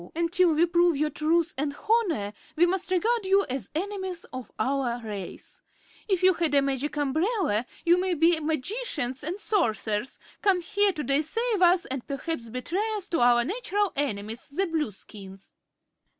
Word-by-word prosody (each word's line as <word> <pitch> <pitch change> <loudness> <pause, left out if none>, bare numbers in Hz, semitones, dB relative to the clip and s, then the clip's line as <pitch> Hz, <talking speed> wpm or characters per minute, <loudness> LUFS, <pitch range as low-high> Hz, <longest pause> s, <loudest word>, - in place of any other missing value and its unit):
Until 340 +1 +2
we 330 +3 +4
prove 345 -2 +3
your 300 +1 0
truth 320 +3 +1
and 285 0 -1
honor 350 - +1 0.2
we 340 - +5
must 370 +1 -1
regard 440 +5 +1
you 390 +1 +3
as 260 +1 -4
enemies 380 0 -3
of 255 -3 -7
our 255 0 0
race. 200 -4 -8 0.5
If 375 -3 0
you 375 0 +6
had 325 -4 0
a 280 - +6
Magic 275 +2 -2
Umbrella 295 - 0 0.2
you 345 +1 +5
may 370 -1 0
be 330 +1 +3
magicians 310 - -2
and 350 +7 -3
sorcerers, 230 - 0 0.2
come 385 -3 +3
here 405 +3 +2
to 305 -5 -4
deceive 365 - +1
us 355 0 +5
and 260 -1 -5
perhaps 275 -3 -4
betray 290 - -2
us 400 -3 -4
to 335 - 0
our 240 0 +5
natural 405 - -1
enemies, 225 -4 -3
the 375 +8 0
Blueskins." 210 - -6
325 Hz, 160 wpm, -27 LUFS, 260-375 Hz, 0.5 s, you